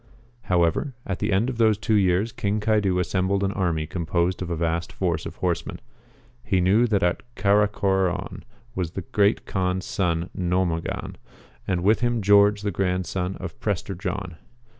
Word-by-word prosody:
However, 90 - +1
at 95 - -3
the 105 +1 -1
end 100 +5 +2
of 125 -3 -4
those 110 -2 +4
two 110 +1 -1
years 100 +2 +2
King 105 0 -1
Caidu 105 -3 +1
assembled 95 +2 0
an 100 - +1
army 85 -6 -1
composed 85 +2 -1
of 90 - -4
a 85 - -1
vast 85 +1 -1
force 85 -4 -2
of - - -9
horsemen. 85 -2 -2 0.6
He 95 - +1
knew 100 +7 +4
that 100 -4 +1
at 90 0 +1
Caracoron 100 -2 +1 0.3
was 90 -4 -3
the 95 - -4
Great 100 +4 +1
Kaan's 95 -1 -1
son 90 -8 -1
No 90 +1 +1
MOGAX, 85 -1 -4 0.5
and 90 -2 0
with 105 +4 +4
him 120 -1 +1
Geokge 100 0 +4
the 105 - 0
grandson 90 0 -1
of 90 -3 -8
Prester 100 -2 -2
John. 90 -2 -5
95 Hz, 165 wpm, -24 LUFS, 90-105 Hz, 0.6 s, those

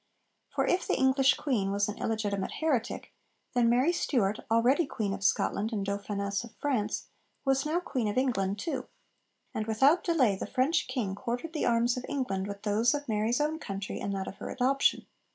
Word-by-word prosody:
For - - 0
if 360 0 +1
the - - +1
English 265 0 +4
queen 215 -9 0
was 200 0 +1
an 210 - -5
illegitimate 205 -3 -1
heretic, 270 -8 -1 0.4
then 240 -2 +3
Mary 255 +8 +3
Stuart, 220 - +1
already 245 +8 +3
Queen 205 -6 -2
of 195 0 -5
Scotland 205 +2 +1
and 205 -3 -2
Dauphiness 200 +1 -2
of 235 -1 -12
France, 235 -8 -1 0.4
was 270 +1 +2
now 325 +3 +1
Queen 255 -10 -2
of 205 - -2
England 205 -7 +1
too; 260 +2 -3 0.7
and 215 0 -3
without 270 +10 +4
delay 265 - +3
the - - -5
French 285 +6 +1
king 215 -8 -2
quartered 245 +10 -4
the 310 - 0
arms 235 +1 +2
of 250 - -4
England 200 -9 -2
with 200 0 -7
those 220 +6 +2
of 290 0 -5
Mary's 220 +2 +1
own 305 +2 0
country 195 -6 -5
and 200 - -3
that 190 -1 -3
of - - -7
her - - -6
adoption. 270 +2 +2
235 Hz, 190 wpm, -29 LUFS, 205-270 Hz, 0.7 s, English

